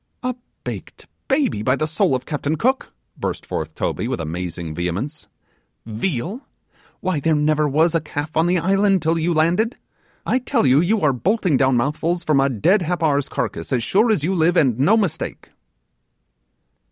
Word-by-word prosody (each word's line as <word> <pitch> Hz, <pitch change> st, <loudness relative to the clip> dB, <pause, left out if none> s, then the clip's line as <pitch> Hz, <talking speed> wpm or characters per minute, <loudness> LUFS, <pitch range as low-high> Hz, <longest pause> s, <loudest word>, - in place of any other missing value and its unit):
'A 255 Hz, 0 st, -1 dB, 0.3 s
baked -, -, -7 dB, 0.2 s
baby, 270 Hz, -, +1 dB
by 130 Hz, +4 st, +2 dB
the 155 Hz, -, -1 dB
soul 160 Hz, 0 st, +1 dB
of 125 Hz, -, -4 dB
Captain 150 Hz, 0 st, -2 dB
Cook!' 260 Hz, -, 0 dB, 0.3 s
burst -, -, -4 dB
forth 80 Hz, 0 st, -4 dB
Toby, -, -, -2 dB
with -, -, -2 dB
amazing 85 Hz, 0 st, -4 dB
vehemence; 95 Hz, -, -4 dB, 0.6 s
'Veal? 145 Hz, -, -3 dB, 0.6 s
why 185 Hz, -5 st, 0 dB
there 160 Hz, +2 st, +2 dB
never 150 Hz, 0 st, +2 dB
was 160 Hz, +4 st, +3 dB
a 165 Hz, -, +2 dB
calf 150 Hz, 0 st, -5 dB
on 160 Hz, +2 st, +3 dB
the 180 Hz, +1 st, +2 dB
island 195 Hz, +1 st, +2 dB
till 165 Hz, +1 st, +1 dB
you 165 Hz, +2 st, 0 dB
landed. 175 Hz, -, +1 dB, 0.5 s
I 255 Hz, -, +2 dB
tell 255 Hz, -, 0 dB
you 135 Hz, +2 st, +5 dB
you 200 Hz, +6 st, +2 dB
are 145 Hz, -3 st, +3 dB
bolting 185 Hz, -, +1 dB
down 130 Hz, -1 st, +3 dB
mouthfuls 160 Hz, +7 st, -1 dB
from 155 Hz, -4 st, +2 dB
a 135 Hz, 0 st, +3 dB
dead 170 Hz, -, +2 dB
Happar's 160 Hz, -5 st, 0 dB
carcass, -, -, -3 dB
as 125 Hz, -3 st, +1 dB
sure 215 Hz, -, +3 dB
as 185 Hz, -9 st, +1 dB
you 180 Hz, +5 st, +1 dB
live, 175 Hz, 0 st, +2 dB
and 130 Hz, -7 st, +3 dB
no 195 Hz, +12 st, +4 dB
mistake! 185 Hz, -7 st, -3 dB
160 Hz, 175 wpm, -21 LUFS, 135-185 Hz, 0.6 s, you